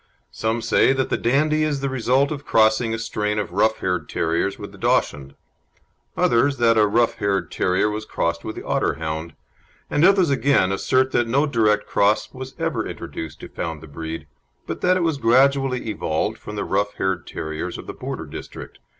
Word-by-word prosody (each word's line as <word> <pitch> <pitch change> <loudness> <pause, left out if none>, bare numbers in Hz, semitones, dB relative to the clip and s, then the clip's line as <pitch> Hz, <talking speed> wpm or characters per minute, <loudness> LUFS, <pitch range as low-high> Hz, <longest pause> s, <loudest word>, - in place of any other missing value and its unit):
Some 110 +1 -2
say 135 - +4
that 130 -1 -1
the - - +3
Dandie 150 +5 +2
is 150 -3 0
the 140 - 0
result 130 +2 +1
of 145 -2 -5
crossing 110 -1 +3
a 115 - -1
strain 105 -1 -2
of 105 -4 -2
rough 110 +4 +1
haired 90 -5 -1
terriers 85 +4 -1
with - - -8
the - - -15
Dachshund; 70 -1 0 0.8
others 135 +4 +3
that 115 -1 +4
a 105 -1 +4
rough 115 +3 +1
haired 95 -4 -1
terrier 90 +3 +1
was 105 +1 -3
crossed 85 -5 -2
with 110 - -5
the - - -7
Otterhound; 80 +1 -2 0.6
and 145 - +2
others 185 -4 +5
again 135 -9 +3
assert 130 +6 +1
that 120 -1 +1
no 140 +6 +2
direct 110 -6 +2
cross 105 +2 +1
was 130 +1 -8
ever - - -2
introduced 80 -1 -7
to - - -7
found 80 -2 -5
the 80 - -12
breed, 80 +1 -6 0.4
but - - -5
that 185 0 +3
it 180 - 0
was 160 -4 0
gradually 130 +1 +3
evolved - - -2
from - - -8
the - - -2
rough 105 0 -1
haired 95 -3 -2
terriers 80 +3 -5
of - - -9
the - - -6
Border - - -6
district. - - -9
110 Hz, 190 wpm, -22 LUFS, 90-135 Hz, 0.8 s, others